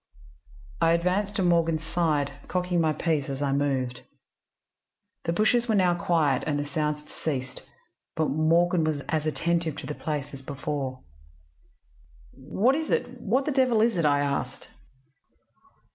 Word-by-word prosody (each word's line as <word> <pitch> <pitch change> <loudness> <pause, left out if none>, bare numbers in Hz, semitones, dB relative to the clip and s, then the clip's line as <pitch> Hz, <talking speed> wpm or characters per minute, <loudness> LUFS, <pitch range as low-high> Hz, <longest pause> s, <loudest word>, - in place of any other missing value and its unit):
I 165 - +5
advanced 185 +4 0
to 195 - +1
Morgan's 165 -3 +2
side, 150 -5 0
cocking 180 -1 0
my 160 -1 +2
piece 155 -3 -1
as 135 -1 -4
I 140 -1 0
moved. 130 -3 -1 1.2
"The 165 - +1
bushes 230 +6 +2
were 220 - +2
now 180 -3 +4
quiet, 160 -6 +1
and 150 -2 0
the 145 - -2
sounds 150 +1 -1
had 150 - -22
ceased, 135 -4 -3 0.5
but 160 -1 +1
Morgan 165 +3 +3
was 155 -2 -1
as 155 -1 0
attentive 165 0 0
to - - -6
the 150 - -4
place 150 -2 -4
as 135 - -8
before. 135 -1 -4 1.3
"'What 190 - +1
is 315 +2 -2
it? 245 0 -1
What 250 +5 +1
the 300 - 0
devil 255 -4 +3
is 230 -2 +2
it?' 170 - 0
I 145 -1 +3
asked. 140 -1 -3
160 Hz, 155 wpm, -26 LUFS, 145-180 Hz, 1.3 s, I